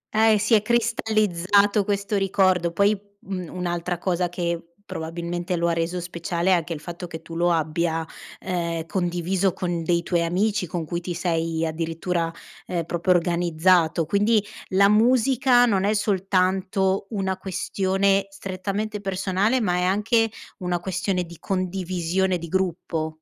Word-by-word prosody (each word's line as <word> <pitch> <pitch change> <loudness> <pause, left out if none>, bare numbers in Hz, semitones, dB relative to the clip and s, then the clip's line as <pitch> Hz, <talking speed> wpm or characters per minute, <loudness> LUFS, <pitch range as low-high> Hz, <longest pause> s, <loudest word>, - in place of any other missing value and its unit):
Eh, 220 -1 +5
si 215 +2 +1
è 215 - +6
cristallizzato 210 -3 +2
questo 200 +1 -1
ricordo. 185 -3 +2
Poi 200 +4 +3 0.3
un 185 -3 -5
un'altra 175 -1 -3
cosa 180 0 0
che 170 -1 -2 0.2
probabilmente 170 +2 -4
lo 170 0 +1
ha - - +1
reso 165 +2 -1
speciale 170 +1 -2
è - - +6
anche 170 -1 0
il 155 - -7
fatto 175 +2 -7
che 165 -1 -8
tu 165 - -9
lo 175 +1 +2
abbia, 165 0 0 0.4
ehm, 170 -3 -2
condiviso 180 +1 0
con 175 -2 -2
dei 170 +1 +1
tuoi 170 -1 +1
amici, 190 +3 0
con 170 -1 -3
cui 170 +3 -3
ti 175 0 -4
sei 165 -2 -1
addirittura, 165 +1 -2 0.4
ehm, 170 -2 -1
proprio 175 +2 +1
organizzato. 170 -1 +2
Quindi 205 +4 +2 0.3
la 200 +1 +5
musica 245 +3 +4
non 195 -5 +1
è 210 +2 +2
soltanto 190 -1 +1
una 190 -3 -1
questione 195 +1 0
strettamente 195 +2 -4
personale, 195 +5 0
ma 180 -5 +1
è 180 - +1
anche 220 +4 +2 0.3
una 180 -1 -1
questione 185 +1 -1
di 170 -1 -11
condivisione 185 -1 -1
di 170 - -7
gruppo. 170 -3 -1
180 Hz, 145 wpm, -24 LUFS, 170-195 Hz, 0.4 s, è